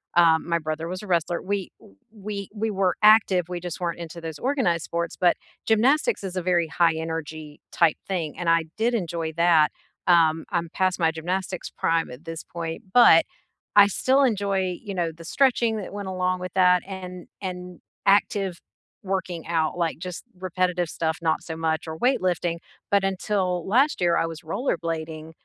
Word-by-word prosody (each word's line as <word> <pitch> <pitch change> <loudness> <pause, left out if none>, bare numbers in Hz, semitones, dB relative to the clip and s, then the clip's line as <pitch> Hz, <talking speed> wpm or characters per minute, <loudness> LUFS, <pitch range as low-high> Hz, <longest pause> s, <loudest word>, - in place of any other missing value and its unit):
um, 165 -2 +4
my 170 0 +1
brother 155 +1 -4
was 185 +2 -5
a 210 - -9
wrestler 170 -1 0
We 200 0 -3
w 95 - -19 0.2
we 205 -2 -6
we 220 +1 -2
were 190 -2 +1
active, 205 -5 +5
we 180 -1 -4
just 175 -1 -6
weren't 170 -1 -2
into 170 0 -7
those 160 -2 -6
organized 245 - 0
sports, 170 0 -3
but 175 -1 +4 0.3
gymnastics 270 - +2
is 190 -1 -5
a - - 0
very 175 -2 +1
high 165 +2 +2
energy 160 -2 -5
type 165 -3 +3
thing. 170 -6 -3
And 175 -1 -1
I 165 0 +4
did 230 +2 +1
enjoy 170 -6 -2
that 165 -2 +4 0.4
um, 165 -2 +4
I'm 170 -1 -1
past 185 -1 0
my 165 -1 +3
gymnastics 180 +3 -3
prime 165 0 0
at 125 +6 -12
this 165 0 -6
point, 165 -1 -6
but 245 -1 +8 0.5
I 205 -1 +8
still 260 +7 +2
enjoy, 195 -6 0
you 200 - -5
know, 175 -3 -1
the 165 +1 -13
stretching 235 -1 +2
that 200 -2 -6
went 205 -1 -5
along 185 0 -1
with 180 -1 -6
that 180 -1 +5
and 180 -2 -8
and 180 -2 -6 0.3
active 195 -2 +2 0.4
working 185 -4 -3
out, 165 -1 0
like 165 -2 -1
just 180 0 -6 0.2
repetitive 180 -1 -1
stuff 160 -1 -2
not 160 -1 +1
so 160 - -6
much 160 0 -1
or 160 - -5
weight 255 +5 +2
lifting. 175 -2 -1 0.3
But 200 -1 +4
until 185 -2 -1
last 260 +7 +2
year, 175 -1 +3
I - - +2
was 165 -1 -8
rollerblading- 160 - -3
180 Hz, 180 wpm, -24 LUFS, 165-195 Hz, 0.5 s, but